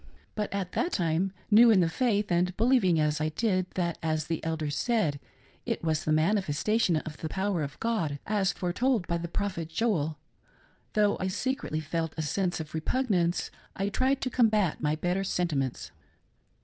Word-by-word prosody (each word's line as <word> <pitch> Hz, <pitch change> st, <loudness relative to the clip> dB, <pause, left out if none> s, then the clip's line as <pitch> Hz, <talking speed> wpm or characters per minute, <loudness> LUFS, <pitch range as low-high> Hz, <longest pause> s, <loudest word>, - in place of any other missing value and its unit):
But 210 Hz, -1 st, -3 dB
at 195 Hz, -3 st, -3 dB
that 350 Hz, -, -1 dB
time, 175 Hz, +1 st, +1 dB, 0.2 s
new 230 Hz, +3 st, +8 dB
in 215 Hz, -4 st, +6 dB
the 175 Hz, -, +3 dB
faith, 210 Hz, +1 st, 0 dB
and 180 Hz, +1 st, +1 dB
believing 220 Hz, -8 st, +3 dB
as 150 Hz, 0 st, +1 dB
I 155 Hz, -, +1 dB
did, 185 Hz, +2 st, 0 dB
that, 170 Hz, -2 st, -1 dB
as 155 Hz, -2 st, -1 dB
the 165 Hz, 0 st, -3 dB
elders 160 Hz, -2 st, -2 dB
said, 165 Hz, -, +1 dB, 0.4 s
it -, -, -3 dB
was 155 Hz, -2 st, 0 dB
the 155 Hz, -, +1 dB
manifestation 180 Hz, +3 st, +2 dB
of 155 Hz, 0 st, -6 dB
the 160 Hz, -, -5 dB
power 190 Hz, 0 st, -1 dB
of 145 Hz, -1 st, -5 dB
God, 210 Hz, -11 st, -1 dB
as 200 Hz, -2 st, +1 dB
foretold 205 Hz, +4 st, 0 dB
by 170 Hz, 0 st, -1 dB
the 170 Hz, -, -4 dB
prophet 170 Hz, -2 st, -3 dB
Joel, 160 Hz, -5 st, 0 dB, 0.8 s
though 210 Hz, -1 st, +3 dB
I 185 Hz, -, -1 dB
secretly 205 Hz, -, -2 dB
felt 160 Hz, +1 st, -3 dB
a 160 Hz, -, -1 dB
sense 175 Hz, +4 st, -1 dB
of 155 Hz, -1 st, -7 dB
repugnance, 175 Hz, 0 st, 0 dB, 0.2 s
I 195 Hz, +1 st, -1 dB
tried 260 Hz, +6 st, +1 dB
to 255 Hz, -, -2 dB
combat 215 Hz, -8 st, +2 dB
my 150 Hz, 0 st, +1 dB
better 180 Hz, +4 st, -1 dB
sentiments. 155 Hz, -9 st, -2 dB
180 Hz, 175 wpm, -28 LUFS, 160-210 Hz, 0.8 s, new